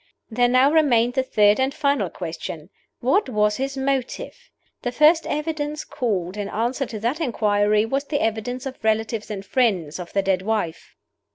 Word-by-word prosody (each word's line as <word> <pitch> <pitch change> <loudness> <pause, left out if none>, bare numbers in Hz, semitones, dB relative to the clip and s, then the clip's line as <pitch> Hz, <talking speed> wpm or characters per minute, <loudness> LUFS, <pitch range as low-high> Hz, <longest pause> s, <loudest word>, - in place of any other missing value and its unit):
There 245 +2 +3
now 255 +3 +4
remained 245 -7 +3
the 265 - +2
third 210 -4 +3
and 265 +1 +2
final 280 - 0
question 165 0 -7 0.3
What 270 - +2
was 210 -2 +1
His 270 +1 -3
Motive? 275 - -3 0.3
The 245 - -2
first 310 +5 +4
evidence 300 0 -3
called 195 -6 -2
in 205 -1 -3
answer 240 +4 -1
to 225 -3 -6
that 250 +9 -1
inquiry 210 -5 +2
was 275 +5 -1
the 285 0 -1
evidence 225 +3 -2
of 260 -3 -7
relatives 220 0 0
and 200 -2 -5
friends 190 - 0
of 175 - -7
the 195 - +1
dead 190 -1 +1
wife. 190 -5 -3
235 Hz, 170 wpm, -23 LUFS, 210-275 Hz, 0.3 s, now